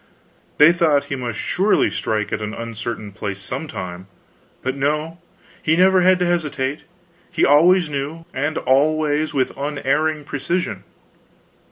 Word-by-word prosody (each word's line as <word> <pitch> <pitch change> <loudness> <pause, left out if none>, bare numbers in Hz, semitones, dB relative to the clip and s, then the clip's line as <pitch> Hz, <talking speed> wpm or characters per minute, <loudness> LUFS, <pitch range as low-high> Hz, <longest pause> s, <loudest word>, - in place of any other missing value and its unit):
They 150 +3 +8
thought 160 -5 +2
he - - 0
must 120 -5 -4
surely 195 +4 +1
strike 110 -2 -2
an 105 0 -3
uncertain 115 -2 -6
place 100 0 -5
some 130 +9 -5
time; 90 -6 -7 0.6
but 130 +1 -2
no, 150 +4 -1 0.4
he 155 - +2
never 185 0 +5
had 185 +1 +5
to 180 - 0
hesitate, 150 -5 -2 0.5
he - - +2
always 170 +5 +5
knew, 150 +3 -5
and 145 +4 -2
always 150 +2 +1
with 130 -2 0
unerring 145 +2 -1
precision. 145 +6 -3
145 Hz, 135 wpm, -20 LUFS, 130-160 Hz, 0.6 s, They